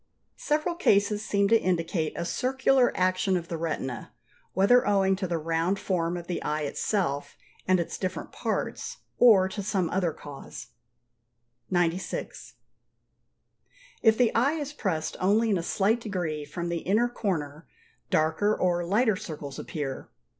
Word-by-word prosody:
Several 305 +4 0
cases 210 - +2
seem 200 -2 +2
to 230 0 +5
indicate 165 -2 0
a - - -3
circular 260 +3 +2
action 185 +1 +2
of 170 -1 -6
the 165 - -3
retina, 145 -6 -4 0.4
whether 225 +6 +4
owing 195 -1 +3
to 190 -1 -2
the 170 -1 -1
round 165 +4 0
form 175 -3 -1
of 170 - -7
the 175 - -3
eye 150 +1 -1
itself 145 -1 -2 0.3
and 185 0 +4
its 170 - -3
different 185 -1 -4
parts, - - -3 0.2
or 210 -6 +7
to 200 +2 -5
some 190 -4 -1
other 180 -3 +1
cause. 145 -2 -10 1.0
96. 175 0 -2 1.5
If 225 -2 +5
the 245 -2 +3
eye 265 +6 +3
is 295 -2 -4
pressed 180 - -2
only 215 +4 +3
in 195 - +3
a - - -1
slight 205 +7 +1
degree 175 -8 -3
from 170 +4 -5
the 170 0 -1
inner 215 +8 +2
corner, 165 -10 -3 0.4
darker 160 +7 +2
or 175 -1 +1
lighter 210 +5 +2
circles 155 -8 -7
appear. 140 -4 -5
185 Hz, 145 wpm, -27 LUFS, 165-215 Hz, 1.5 s, or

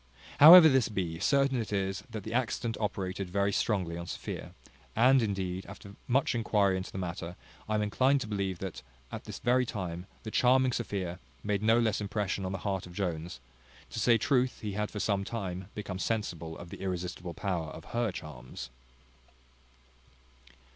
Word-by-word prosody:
However 160 +3 +12
this 130 -6 +3
be, 90 -6 -3
certain 135 +3 +2
it 110 - -6
is 95 -1 -1
that 110 -3 -6
the 110 - -5
accident 115 -2 -1
operated 95 -3 -3
very 100 +2 +1
strongly 90 -7 0
on 85 - -7
Sophia; - - -6 0.4
and, 130 +3 +5
indeed, 95 -3 -2
after 100 +1 -11
much 130 +2 +2
enquiry 105 -4 +2
into 95 0 -4
the - - -7
matter, 90 -1 -4 0.3
I 110 - +1
am 105 - +1
inclined 130 +7 +3
to 115 - -4
believe, 100 -3 -2
that, 85 -8 -6 0.3
at - - -7
this - - -6
very 125 +1 +2
time, 90 -6 -5 0.2
the 110 - -6
charming 130 +2 +4
Sophia 95 -7 -3 0.2
made 105 -1 0
no 110 +2 +4
less 110 -3 +1
impression 100 -1 -2
on 95 - -2
the 95 - -2
heart 95 -3 -1
of 90 - -12
Jones; 85 -7 -3 0.5
to - - -4
say 115 +1 +5
truth, 130 +2 +1
he 105 - -3
had 105 +1 -2
for 105 - -6
some 100 -1 +1
time 95 -4 -4
become 100 -3 -5
sensible 85 -7 -2
of 85 0 -10
the - - -9
irresistible 90 -1 -4
power 95 -6 -2
of - - -10
her 120 -2 +1
charms. 75 -7 -8
100 Hz, 175 wpm, -30 LUFS, 90-115 Hz, 0.5 s, However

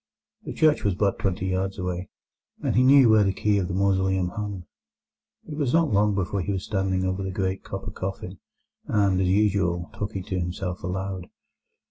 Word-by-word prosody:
The - - -5
church 155 -1 +3
was 100 -3 +1
but 100 0 0
twenty 95 -1 -1
yards 95 +1 -1
away, 90 -1 -4 0.5
and - - 0
he 125 - +5
knew 135 0 +7
where 110 -1 +6
the 100 - +2
key 105 +1 +1
of 90 - -1
the 90 - -3
mausoleum 95 -1 +1
hung. 100 -2 -5 0.8
It 150 - -6
was 140 -5 0
not 165 -8 +3
long 105 0 +3
before 95 0 -1
he 95 - -2
was 95 -1 -2
standing 95 -2 0
over 95 +1 -1
the 95 - -3
great 95 0 -2
copper 95 +2 -6
coffin, 95 -1 -6 0.5
and, 100 -3 +2
as 95 - +1
usual, 95 -4 +1
talking 100 -2 -4
to 95 -2 -3
himself 90 +1 -4
aloud. 95 0 -4
95 Hz, 185 wpm, -25 LUFS, 95-100 Hz, 0.8 s, knew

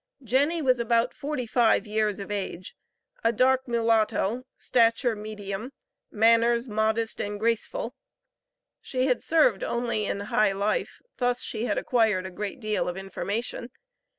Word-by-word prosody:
Jenny 285 +7 +1
was 255 -2 +3
about 235 +1 +1
forty 280 -3 -4
five 230 -2 +3
years 215 -1 0
of 200 0 -7
age, 190 -3 -4 0.5
a 230 - +4
dark 260 +3 +2
mulatto, 230 0 +1
stature 230 0 +2
medium, 210 +3 -6 0.4
manners 230 +2 +3
modest 220 +1 0
and 205 0 -4
graceful; 230 - -1 0.9
she 255 -1 -1
had 250 -3 +1
served 300 -11 +3
only 235 -3 -1
in - - -2
high 205 0 +2
life; 200 +2 -2
thus 245 -1 0
she 225 +1 -3
had - - -1
acquired 220 -6 +1
a 190 - -6
great 205 +5 -5
deal 215 -2 -1
of 175 - -5
information. 205 +5 -4
230 Hz, 140 wpm, -26 LUFS, 210-245 Hz, 0.9 s, a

